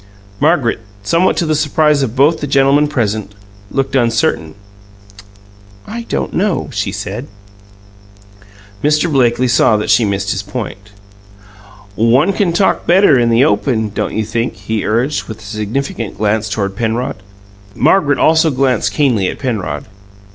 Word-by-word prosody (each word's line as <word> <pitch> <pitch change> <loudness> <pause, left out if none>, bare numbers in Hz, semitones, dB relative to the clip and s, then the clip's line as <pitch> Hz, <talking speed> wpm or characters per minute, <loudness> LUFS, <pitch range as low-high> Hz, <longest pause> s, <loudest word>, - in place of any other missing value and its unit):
Margaret, 145 -5 +2 0.2
somewhat 170 - +2
to 170 - +1
the 155 - 0
surprise 150 -1 +2
of 125 -3 -2
both 150 +5 +3
the 145 - -2
gentlemen 140 +2 +3
present, 110 -7 -2 0.3
looked 135 -1 -2
uncertain. 115 -10 0 1.3
"I 230 +2 -7
don't - - -2
know," 195 0 -1
she - - -2
said. - - -5 1.6
Mr. 150 +3 +2
Blakely 125 -1 +2
saw 120 -2 +3
that 105 - -1
she 120 - +4
missed 100 -1 -1
his 100 - -2
point. 105 -2 -7 1.0
"One 125 - +3
can 195 -4 +1
talk 190 +3 +1
better 175 -6 +5
in 120 -1 +2
the 115 +4 +4
open, 115 -8 0
don't 100 - -3
you 110 - 0
think?" 115 +2 -2
he 105 +3 -3
urged, 120 +7 0
with 110 - -8
a 110 - -15
significant 110 +2 -4
glance 105 +1 0
toward 100 -1 -2
Penrod. 120 +4 -2 0.6
Margaret 145 -1 +3
also 160 0 +3
glanced 130 -2 0
keenly 120 -10 +1
at - - -4
Penrod. 95 - -3
125 Hz, 145 wpm, -15 LUFS, 110-150 Hz, 1.6 s, better